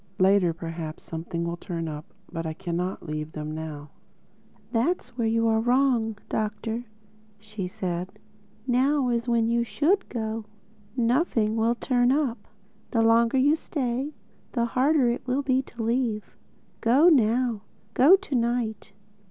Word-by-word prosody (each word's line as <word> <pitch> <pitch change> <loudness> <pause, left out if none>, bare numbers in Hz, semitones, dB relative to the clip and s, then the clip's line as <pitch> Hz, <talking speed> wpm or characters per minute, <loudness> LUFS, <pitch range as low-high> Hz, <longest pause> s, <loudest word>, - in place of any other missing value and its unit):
Later 190 -2 +4
perhaps 165 -1 -6
something 170 +1 -4
will 170 0 -3
turn 170 -2 -4
up. 150 0 -7 0.2
But 165 -2 -4
I 160 - -3
cannot 180 +1 -3
leave 155 0 -5
them 155 0 -5
now." 155 -2 -7 0.8
"That's 275 +11 0
where 235 -2 0
you're 225 0 +2
wrong, 240 -2 +2
Doctor," 220 +2 -3 0.5
said 185 -4 -4
she. 210 +1 -29
"Now 265 +2 +2
is 235 0 -1
when 230 -1 +2
you 235 0 +2
should 325 - +1
go. 220 -2 -3 0.5
Nothing 235 -3 +2
will 230 +1 +2
'turn 245 0 +2
up.' 260 -7 -1 0.4
The 230 -3 +2
longer 230 +3 +4
you 285 +4 +4
stay, 270 -2 -3 0.4
the 235 -2 +1
harder 260 +3 +2
it 240 - -5
will 260 +3 0
be 260 -1 +2
to 240 -3 -8
leave—Go 235 +3 0
now. 240 -5 +2 0.3
Go 295 +9 +7
to 390 -6 -6
night." 235 -4 -1
230 Hz, 135 wpm, -26 LUFS, 190-250 Hz, 0.8 s, Go